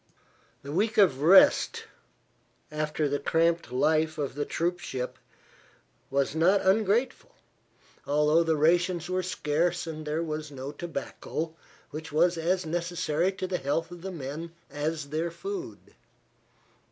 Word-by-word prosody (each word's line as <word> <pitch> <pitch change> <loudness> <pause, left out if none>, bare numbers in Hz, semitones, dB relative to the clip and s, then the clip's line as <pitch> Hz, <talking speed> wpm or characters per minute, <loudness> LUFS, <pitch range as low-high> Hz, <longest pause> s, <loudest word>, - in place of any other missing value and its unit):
This 140 - -7
week 215 +8 0
of 175 -10 +4
rest, 195 - +6 0.9
after 150 0 -1
the 145 0 -1
cramped 165 -1 +1
life 155 +4 +2
of 145 -3 -2
the 145 +2 -2
troop 175 +2 -1
ship, 125 -6 -5 0.9
was 140 0 0
not 180 +5 +4
ungrateful, 220 - +1 0.7
although 150 +3 +3
the 165 -1 +2
rations 175 +3 +2
were 185 0 +1
scarce 175 -1 0
and 155 -2 -6
there 155 +2 -1
was 155 -1 -4
no 135 0 -6
tobacco, 165 0 -5 0.4
which 155 +1 -7
was 170 +4 +3
as 175 +2 0
necessary 170 +1 0
to 190 - -4
the 185 -1 -2
health 145 +5 -1
of 175 -1 -9
the 190 +2 -5
men 160 +1 -6 0.2
as 150 0 -3
their 160 +3 -1
food. 370 - -7
165 Hz, 135 wpm, -28 LUFS, 150-180 Hz, 0.9 s, rest